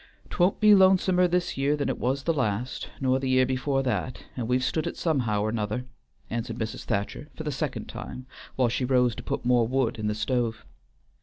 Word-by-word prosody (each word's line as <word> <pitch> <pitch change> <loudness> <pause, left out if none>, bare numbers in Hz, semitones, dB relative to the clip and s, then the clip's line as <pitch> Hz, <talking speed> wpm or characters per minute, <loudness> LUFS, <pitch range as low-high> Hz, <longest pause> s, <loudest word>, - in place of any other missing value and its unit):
"'T - - -6
won't 180 +2 +3
be 215 -1 +7
lonesomer 185 -2 +5
this 180 -2 -1
year 145 +2 +2
than 145 - -1
it - - -2
was 135 +3 -1
last, 125 -6 -1
nor 130 -1 +2
the 135 -1 -2
year 130 0 +4
before 135 +1 0
that, 125 0 -2
and 120 -3 -3
we've 125 +1 +1
stood 155 +3 0
it - - -5
somehow 120 -11 0
or 110 - 0
'nother," 110 +2 -2 0.4
answered 115 0 -4
Mrs. 110 -1 -4
Thacher 100 +8 -2
for 155 - -6
the 150 - -2
second 135 - -3
time, 125 - -8 0.3
while 130 -2 +3
she 120 +2 -1
rose 125 -2 +3
to - - -7
put - - -4
more 120 -2 +4
wood 130 -3 0
in 105 - -1
the 105 - 0
stove. 115 0 -1
130 Hz, 210 wpm, -27 LUFS, 115-140 Hz, 0.4 s, be